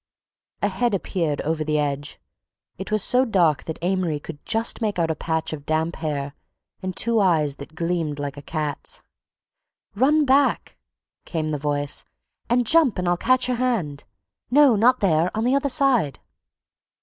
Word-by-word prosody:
A - - +4
head 210 +3 0
appeared 165 -6 -2
over 160 0 -1
the 150 0 0
edge—it 145 +6 -6
was 215 -2 +2
so 250 +1 +3
dark 175 - +2
that 160 - -5
Amory 180 -4 0
could 145 0 -10
just 225 +1 0
make 210 -3 -1
out 165 -2 +1
a - - -2
patch 160 +1 -2
of 145 -2 -7
damp 160 +2 -1
hair 145 -3 -3 0.5
and 185 -1 -4
two 230 -1 +2
eyes 155 -7 +2
that 145 +2 -11
gleamed 165 -3 -2
like 145 -1 -4
a 145 - -9
cat's. 150 -1 -4 0.9
"Run 290 +8 +3
back!" 275 +1 +2 0.5
came 155 -3 -3
the 150 -1 -2
voice, 145 0 -2 0.5
"and 245 +1 +2
jump 310 -4 +4
and 180 -1 -2
I'll 175 - +3
catch 255 +7 +2
your 250 -1 -1
hand—no, 230 - 0
not 235 +5 +3
there—on 180 +3 +1
the 250 +2 +2
other 280 0 +1
side." 250 - +2
175 Hz, 160 wpm, -23 LUFS, 150-235 Hz, 0.9 s, A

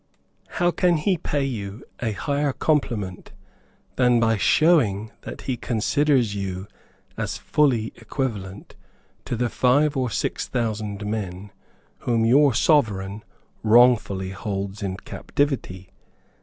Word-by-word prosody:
How 175 0 +3
can 175 0 +2
he 185 +5 +1
pay 145 -3 -2
you 110 -4 -5 0.2
a 115 -3 -1
higher 140 +6 -1
compliment 115 - -1 0.6
than 125 -2 +4
by 115 -1 +3
showing 110 - +3
that - - -8
he 130 -2 -3
considers 125 +1 +1
you 95 -2 -4 0.5
as - - -3
fully 125 -7 +1
equivalent 105 -5 -5 0.5
to - - -2
the 120 +1 0
five 140 +5 +2
or 130 -2 0
six - - -2
thousand 110 -3 -3
men 100 -2 -4 0.5
whom 115 -2 +1
your 135 +2 +5
sovereign 105 - +1 0.4
wrongfully 110 -5 +4
holds 100 +1 -4
in 95 -2 -3
captivity? 100 -8 -3
115 Hz, 115 wpm, -23 LUFS, 100-135 Hz, 0.6 s, your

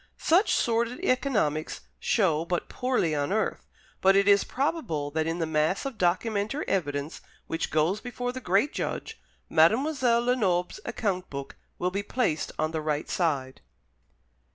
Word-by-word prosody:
Such 360 +7 +3
sordid 235 +4 0
economics 215 - 0 0.2
show 165 -8 +2
but 175 0 -2
poorly 250 -11 0
on 145 +3 -1
earth; 215 +2 -1 0.3
but 195 +1 +5
it 200 0 +4
is 200 -1 +6
probable 245 - -2
that 160 +1 -1
in 165 +1 -1
the 165 - 0
mass 160 - 0
of 270 -4 -5
documentary 205 - 0
evidence 145 -5 -2 0.2
which 165 - -2
goes 165 +7 +1
before 245 0 -4
the 260 +1 -7
Great 200 +9 +2
Judge, 450 - -4 0.3
Mademoiselle 240 - +3
Lenoble's 200 - +1
account 185 -4 -2
book 140 -1 -7 0.2
will 180 +1 -1
be 200 +2 -1
placed 205 - -1
on 155 0 0
the 160 -1 -2
right 150 -1 -2
side. 140 -7 -1
190 Hz, 150 wpm, -27 LUFS, 160-245 Hz, 0.3 s, is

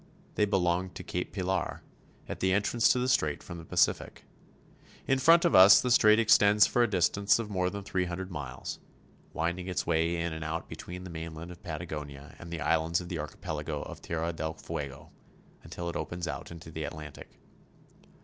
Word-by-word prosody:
They 105 - +2
belong 95 -2 +1
to - - -7
Cape 90 - -4
Pilar, 95 -1 -2 0.4
at - - -6
the 95 0 +2
entrance 105 +4 +2
to - - +4
the 125 0 0
strait 75 - +1
from 85 - -8
the - - -9
Pacific. 85 0 0 0.8
In 135 -1 +2
front 165 +5 +6
of 170 - +3
us 95 +2 +9
the 125 - -1
strait 110 -3 +6
extends 105 -2 +6
for 120 - +1
a 120 - +3
distance 100 +2 +2
of 110 -2 -5
more 90 -2 0
than 100 +1 -6
three 95 -2 -1
hundred 90 +2 -5
miles, 70 -4 -6 0.5
winding 85 +3 -2
its 90 - -2
way 85 0 +1
in 85 -1 -2
and 80 0 -5
out 80 +1 -4
between 90 +1 -8
the 90 - -8
mainland 80 +1 -7
of 90 - -12
Patagonia 75 -4 -7
and 85 - -9
the 85 -1 -5
islands 80 +2 +1
of 90 -1 -8
the 85 -4 -3
archipelago 75 0 -5
of - - -9
Tierra 85 0 -2
del 80 0 -4
Fuego, 70 -3 -7 0.5
until 85 - -7
it 85 - -4
opens 85 0 -4
out 70 -5 -5
into 85 -1 -10
the 80 0 -5
Atlantic. 75 0 -9
85 Hz, 190 wpm, -29 LUFS, 80-95 Hz, 0.8 s, us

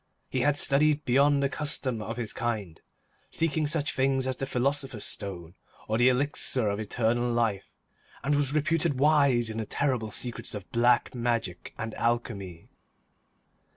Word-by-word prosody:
He 130 - 0
had 145 +2 +2
studied 150 +2 +3
beyond 140 +3 +3
the - - +3
custom 135 -5 -1
of 115 +2 -5
his 115 -3 -2
kind, 105 -8 -3 0.5
seeking 160 -2 0
such 150 -1 0
things 135 0 +1
as 130 0 -1
the 135 - -4
Philosopher's 135 -3 -1
Stone, 85 -4 -6 0.3
or 110 +1 0
the 125 +1 +6
Elixir 130 -3 +1
of 100 +1 -2
Eternal 120 +3 0
Life, 115 -5 -1 0.5
and 140 +3 +1
was 145 -2 +2
reputed 155 -1 +1
wise 140 -5 +4
in 110 0 -4
the 110 - -2
terrible 125 -6 -1
secrets 120 0 -4
of 100 -3 -7
Black 120 +1 +3
Magic 115 -7 -2
and 110 -1 -5
Alchemy. 105 -7 -3
125 Hz, 155 wpm, -28 LUFS, 110-140 Hz, 0.5 s, the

